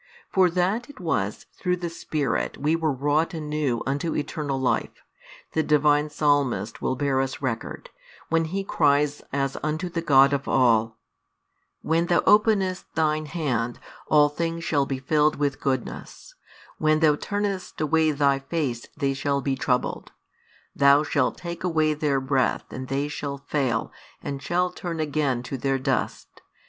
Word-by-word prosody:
For 185 -2 +4
that 190 - 0
it 285 - -13
was 105 - -2
through 180 0 -1
the 175 -1 -4
Spirit 155 -3 -2
we 150 +3 +1
were 160 -2 0
wrought 145 +5 0
anew 150 -6 -2
unto 140 +5 -1
eternal 145 -2 -2
life, 130 - -1 0.5
the 160 - +2
Divine 150 0 +3
Psalmist 140 -8 0
will 130 - 0
bear 135 0 +1
us 135 -1 -3
record, 130 -5 -4 0.4
when 165 0 +1
he 195 +5 -3
cries 145 -4 +2
as 135 -1 -1
unto 155 +4 -2
the 170 -1 -3
God 140 -3 +5
of 140 0 -2
all: 115 -3 +3 0.9
When 165 +2 +1
Thou 175 - +3
openest 205 -4 +3
Thine 155 -1 +1
Hand, 125 -8 -2 0.3
all 150 -1 +5
things 165 +2 -3
shall 140 -4 +1
be 135 - -2
filled 150 +3 +2
with 145 -1 -1
goodness; 130 -3 -4 0.5
when 155 0 +3
|322 - - -4
Thou 150 -2 +5
turnest 205 -1 -3
away 160 +1 +3
Thy 140 -2 +2
Face 135 -5 -3
they 140 -2 0
shall 140 +1 -1
be 135 -1 -1
troubled; 125 -1 -1 0.6
Thou 140 +1 +5
shalt 145 -4 0
take 170 -1 -6
away 160 -3 +2
their 145 -2 0
breath 130 -1 0
and 130 0 -6
they 140 +2 -1
shall 145 -1 -4
fail 130 -6 0 0.3
and 140 -1 -4
shall 180 +5 0
turn 170 -2 -5
again 145 -5 0
to 130 +2 -5
their 135 +1 +1
dust. 135 0 -3
145 Hz, 155 wpm, -25 LUFS, 135-160 Hz, 0.9 s, God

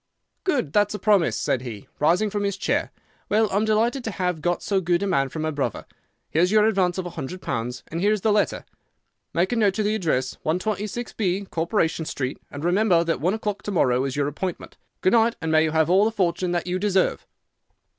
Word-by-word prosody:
"'Good! 255 - 0
That's 205 0 +2
a - - -2
promise,' 190 - +2
said 130 - 0
he, 115 -6 -8
rising 175 +8 +2
from 205 0 -1
his 200 -1 -1
chair. - - -1 0.4
'Well, 215 +1 +3
I'm 205 +3 +1
delighted 230 +5 +1
to - - -1
have 180 -5 -2
got 175 +2 -1
so 195 -2 +1
good 175 +1 +1
a - - +1
man 140 -9 +1
for 160 - -8
my 155 0 -1
brother. 145 -2 -3 0.5
Here's 175 +4 +2
your 215 0 +5
advance 190 -5 +2
of 185 - -3
a 175 - -5
hundred 170 +2 -6
pounds, 125 -5 -4
and 165 +2 -4
here 205 +2 +3
is 215 -2 0
the 220 - +2
letter. 210 0 +1 0.7
Make 175 +3 +1
a - - +1
note 210 -4 +2
of 215 - 0
the 210 - +1
address, 150 -11 -1
126B, 200 +1 -2
Corporation 165 -1 0
Street, 140 -4 -3
and 145 +3 -6
remember 180 -1 +3
that 165 -5 -1
one 180 +6 +1
o'clock 210 -2 -3
to 205 - -5
morrow 130 -8 +2
is 135 -2 -3
your 145 -1 0
appointment. 170 +5 -5 0.3
Good 185 - +3
night; 230 0 +4
and 160 -1 -2
may 155 0 +5
you - - 0
have 160 0 +2
all 185 +4 +4
the 225 - +1
fortune 180 -3 0
that 175 -1 -1
you 180 +1 -2
deserve! 195 -1 +1
180 Hz, 220 wpm, -24 LUFS, 160-210 Hz, 0.7 s, your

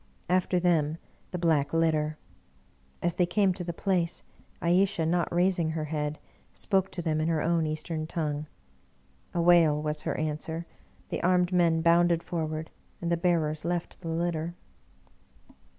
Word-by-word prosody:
After 180 0 +2
them, 165 -3 +2 0.3
the 180 - -4
Black 160 -4 +1
Litter. 155 -2 +1 0.9
As 175 -1 0
they 180 - +3
came 195 0 +2
to 180 - -6
the 170 - -3
place, 175 -1 -1 0.4
Ayesha, 175 -1 +2
not 170 +1 +1
raising 175 -2 +2
her 160 -1 -2
head, 150 -1 -2 0.4
spoke 195 -2 +1
to 175 - -4
them 155 -2 0
in 155 - 0
her 160 -2 +1
own 165 -1 +1
Eastern 155 +1 -3
tongue. 150 -2 -2 0.9
A 170 - +2
wail 165 -4 +5
was 150 0 -2
her - - -2
answer. 155 +2 -3 0.4
The - - -3
armed 180 0 +2
men 170 -2 +3
bounded 170 0 +4
forward, 160 -2 -3 0.3
and 170 0 -2
the - - +4
bearers 165 -3 0
left 175 +1 -3
the 165 - -5
litter. 170 0 -2
165 Hz, 150 wpm, -28 LUFS, 155-175 Hz, 0.9 s, wail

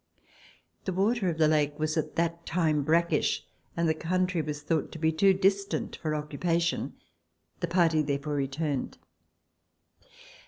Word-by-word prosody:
The 190 - -1
water 200 +1 +1
of 165 - -3
the 155 -1 +4
lake 150 -1 +2
was 155 0 -1
at 160 - -2
that 170 0 -1
time 160 -3 +1
brackish, 170 +4 +1 0.3
and 170 0 +2
the 160 - +3
country 180 +2 0
was 150 -1 -5
thought 160 -1 -1
to - - -6
be 160 0 +2
too 195 +5 +4
distant 195 +1 0
for 155 -1 -2
occupation; 165 +1 -1 0.7
the 175 - -1
party 165 -2 +3
therefore 140 0 -2
returned. 140 0 -2
160 Hz, 145 wpm, -28 LUFS, 150-175 Hz, 0.7 s, the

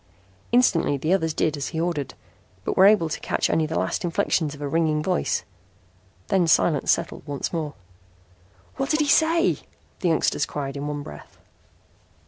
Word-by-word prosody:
Instantly 200 - +3
the 155 +6 0
others 160 -4 +1
did 155 0 0
as 140 -2 -4
he 160 - -4
ordered, 165 -5 -2 0.5
but - - -1
were 190 - +7
able 205 -6 +4
to 155 - -4
catch - - -1
only 160 -1 +1
the 160 - -3
last - - -1
inflections 165 -3 0
of - - -14
a - - -2
ringing 155 0 +1
voice. 70 - 0 0.9
Then 180 -3 +2
silence 160 -2 +2
settled - - -1
once 145 +3 -4
more. 155 -3 -3 1.0
"What 270 +1 -2
did 310 0 +2
he 295 - +1
say," 325 +4 +3 0.4
the 180 - +1
youngsters 160 -2 +1
cried 140 -2 -5
in 140 +1 -4
one 145 -1 -4
breath. 75 - -12
160 Hz, 170 wpm, -24 LUFS, 145-185 Hz, 1.0 s, were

